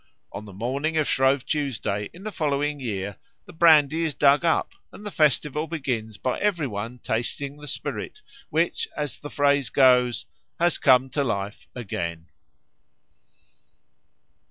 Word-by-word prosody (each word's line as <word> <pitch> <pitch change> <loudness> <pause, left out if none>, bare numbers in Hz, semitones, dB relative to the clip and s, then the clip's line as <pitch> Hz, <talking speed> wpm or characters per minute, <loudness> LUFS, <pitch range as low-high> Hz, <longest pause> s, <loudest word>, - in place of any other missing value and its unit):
On 105 - -7
the 100 - -11
morning 135 +10 -2
of 155 - +2
Shrove 135 0 +2
Tuesday 115 -9 -2
in 180 - -13
the 215 - -4
following 145 -4 -1
year 100 -5 -4 0.3
the 180 - -13
brandy 160 -2 +5
is 155 -3 -1
dug 145 +2 +4
up 165 -1 +1 0.2
and 210 - -12
the 210 - -4
festival 150 -1 +1
begins 125 -9 -3
by 130 - -2
every 190 -7 +1
one 115 +1 -5
tasting 130 +5 -3
the 150 0 -11
spirit 425 - -5 0.3
which, 455 - 0
as 145 -6 -3
the 145 - -8
phrase 140 -3 +2
goes, 125 -3 +4 0.3
has 175 0 +2
come 130 -1 +4
to 145 - 0
life 105 -5 -3
again. 85 -8 -5
140 Hz, 145 wpm, -25 LUFS, 115-150 Hz, 0.3 s, brandy